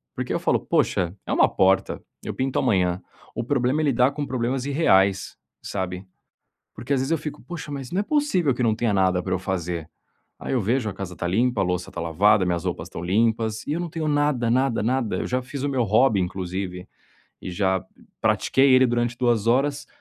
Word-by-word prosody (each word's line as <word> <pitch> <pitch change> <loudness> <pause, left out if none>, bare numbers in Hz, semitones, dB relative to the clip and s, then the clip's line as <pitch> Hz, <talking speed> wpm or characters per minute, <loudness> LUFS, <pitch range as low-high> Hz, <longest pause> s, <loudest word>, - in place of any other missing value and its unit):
porque - - -3
eu - - 0
falo: - - +1
"Poxa, 90 0 0
é - - -2
uma - - +4
porta, 95 0 +2 0.2
eu - - -4
pinto 130 0 -1
amanhã." 90 -6 +1 0.3
O 115 - -2
problema 130 +3 +1
é - - 0
lidar 130 -1 +3
com 145 0 -4
problemas 125 +1 -1
irreais, 100 - +2 0.3
sabe? 95 -1 -4 0.7
Porque 120 +6 -3
às 135 - +2
vezes 135 +4 -2
eu 165 - +3
fico: 150 0 -7
"Poxa, 150 +2 -7
mas 135 -3 -6
não 185 - 0
é - - -3
possível 210 - +1
que 125 - -2
não 115 -2 +3
tenha 115 -2 0
nada 95 -2 +2
pra 95 - -2
eu 95 - 0
fazer.", 90 -4 -3 0.5
aí - - -4
eu 125 - +1
vejo 115 +2 0
a - - -6
casa 95 -1 -6
está 85 - -4
limpa, 115 +4 +1
a - - +3
louça 90 -1 -2
está - - -6
lavada, 95 +5 +3
minhas 85 -1 -1
roupas 90 - -3
limpas, 110 +5 0
e - - -2
eu 165 - -2
não 175 -1 -3
tenho 160 -1 -3
nada, 145 -5 +1
nada, 130 -1 +1
nada, 120 -1 0
eu - - -3
já 125 +1 -1
fiz 130 +2 -7
o 145 - 0
meu 130 -3 +1
hobby, 110 +1 +3
inclusive, 90 0 -4 0.6
e - - -5
já 95 0 0 0.4
pratiquei 135 0 +3
ele 130 0 +6
durante 120 0 -1
2 120 -4 +1
horas, 140 +4 +1
115 Hz, 210 wpm, -24 LUFS, 95-135 Hz, 0.7 s, ele